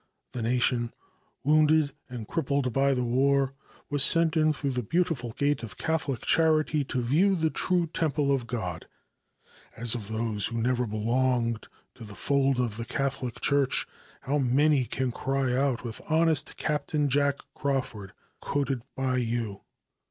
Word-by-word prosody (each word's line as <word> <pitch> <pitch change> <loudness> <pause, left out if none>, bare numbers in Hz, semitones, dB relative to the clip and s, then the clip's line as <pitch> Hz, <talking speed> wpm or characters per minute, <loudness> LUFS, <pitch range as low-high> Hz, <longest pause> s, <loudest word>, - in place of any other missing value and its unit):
The 125 - -5
nation, 120 0 +1 0.5
wounded 155 0 +3 0.2
and 120 -4 -7
crippled 140 -6 -1
by 135 +1 +2
the 125 - 0
war, 135 +2 +2 0.4
was 145 -1 +2
sent 165 +3 +5
in 155 -1 +3
through 145 -2 -2
the 125 -1 -1
beautiful 160 - -1
gate 145 +3 0
of 115 -4 -8
Catholic 155 -6 -1
charity 155 -2 +3
to 130 -2 -2
view 175 +11 +3
the 160 -2 0
true 180 -2 +1
temple 150 -3 0
of 130 -4 0
God. 100 -8 -4 0.9
And 115 - -6
of 110 -5 -5
those 110 -1 0
who 115 0 -3
never 125 +1 0
belonged 115 +1 0 0.3
to 125 - -12
the 105 -1 -9
fold 135 -2 +1
of 115 -4 -1
the 115 - -4
Catholic 135 -2 -3
Church 140 -2 +2 0.4
how 145 +3 -1
many 135 +1 +3
can 130 +1 -2
cry 135 0 -1
out 130 -2 0
with 115 -3 -4
honest 160 -1 +2
Captain 150 0 0
Jack 140 +1 +2 0.2
Crawford, 130 -8 -3 0.3
quoted 135 -3 -2
by 130 -1 0
you. 115 -4 -2
135 Hz, 150 wpm, -27 LUFS, 120-145 Hz, 0.9 s, sent